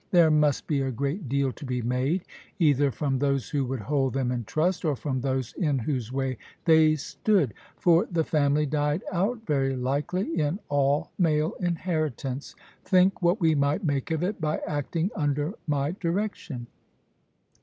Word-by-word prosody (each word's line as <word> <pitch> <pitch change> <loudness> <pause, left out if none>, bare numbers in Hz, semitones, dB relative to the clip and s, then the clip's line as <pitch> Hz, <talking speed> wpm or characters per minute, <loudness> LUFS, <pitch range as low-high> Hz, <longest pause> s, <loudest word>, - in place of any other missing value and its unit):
There 170 -3 +5
must 150 -2 +2
be 145 -3 0
a 135 - -1
great 140 - -3
deal 140 0 +1
to 150 - -12
be 125 -3 -2
made, 130 +9 0 0.3
either 145 -5 +3
from 135 0 -1
those 140 -2 0
who 140 -2 0
would 130 -2 -3
hold 135 +3 0
them 130 -2 0
in 120 -2 -2
trust, 165 - 0
or 155 -4 +1
from 130 -1 -3
those 130 -3 -2
in 150 -5 0
whose 125 -2 -2
way 130 -2 -2 0.3
they 160 -1 +6
stood. 155 - 0 0.2
For 170 0 +4
the 165 -2 +2
family 150 -1 +2
died 150 +3 0
out, 215 +6 -1
very 135 -3 +1
likely, 150 +7 -1
in 150 +4 0
all 145 0 +1
male 155 -2 +2
inheritance. 155 - -2 0.3
Think 185 0 +3
what 175 +4 +3
we 165 -3 +3
might 145 +6 +1
make 140 -5 -1
of 160 +1 -1
it, 195 0 -2
by 155 0 0
acting 160 +5 -2
under 145 +2 0
my 145 0 0
direction. 175 - -3
145 Hz, 165 wpm, -27 LUFS, 135-165 Hz, 0.3 s, they